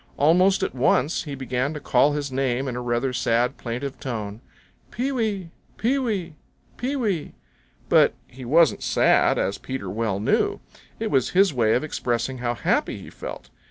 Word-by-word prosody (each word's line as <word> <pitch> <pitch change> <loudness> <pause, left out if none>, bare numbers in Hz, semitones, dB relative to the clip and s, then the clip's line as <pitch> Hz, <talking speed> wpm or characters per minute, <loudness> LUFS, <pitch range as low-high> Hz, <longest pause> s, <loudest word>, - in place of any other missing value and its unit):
Almost 180 +6 +4
at - - -1
once 135 +5 +1
he 145 -2 -5
began 130 +2 -2
to - - -4
call 140 +1 +3
his 145 -2 -3
name 130 0 0
in 125 - -3
a 125 - -3
rather 120 +2 -1
sad, 120 +2 +1
plaintive 130 +3 -5
tone, 110 -4 -5 0.5
"Pee 255 +4 -2
wee! 210 -9 -2 0.3
Pee 260 +5 +1
wee! 200 -10 -2 0.4
Pee 260 +4 -2
wee!" 205 - -1 0.5
But - - +4
he 130 +1 -12
wasn't 155 +5 +4
sad, - - +3
as 100 - -1
Peter 130 -8 -5
well 110 -2 -1
knew. 105 - +1 0.4
It - - -2
was 130 -3 +2
his 195 -4 +5
way 115 -4 +3
of 125 - 0
expressing 125 -3 -2
how 120 0 -1
happy - - 0
he - - -11
felt. - - -8
135 Hz, 170 wpm, -24 LUFS, 120-170 Hz, 0.5 s, his